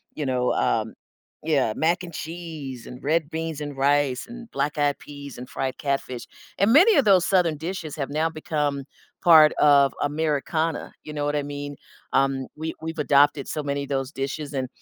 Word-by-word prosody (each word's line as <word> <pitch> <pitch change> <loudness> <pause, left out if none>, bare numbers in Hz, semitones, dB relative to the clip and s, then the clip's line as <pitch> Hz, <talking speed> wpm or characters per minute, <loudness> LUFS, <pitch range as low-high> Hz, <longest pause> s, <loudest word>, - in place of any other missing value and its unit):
you 150 - -3
know, 125 -1 +1
um, 110 0 0 0.5
yeah, 140 -8 +1
mac 170 +3 +1
and 170 - -8
cheese, 155 -8 -7
and 125 +2 -10
red 155 +1 +1
beans 160 -2 -4
and 145 -2 -6
rice 140 -2 +2
and 240 -1 -10
black 145 +2 -1
eyed 145 -1 +2
peas 140 -3 -10
and 125 - -8
fried 130 -1 -3
catfish. 135 -4 -3 0.3
And 200 +5 +3
many 370 +8 +7
of 275 - +4
those 190 -4 +5
Southern 180 -5 +2
dishes 165 -2 -5
have 140 -2 -3
now 155 +3 0
become 150 -3 -2 0.4
part 155 -3 +8
of 140 -2 +5
Americana. 155 +2 -1
You 150 - -8
know 145 -1 -2
what 145 0 0
I 145 - 0
mean? 145 0 -6 0.4
Um 135 -1 +1
we 160 +1 -4
we've 160 0 -5
adopted 145 -1 +3
so 150 - -3
many 140 0 -2
of 140 - -9
those 135 -1 -2
dishes 140 +2 -4
and, 130 -2 -2
145 Hz, 185 wpm, -24 LUFS, 140-160 Hz, 0.5 s, part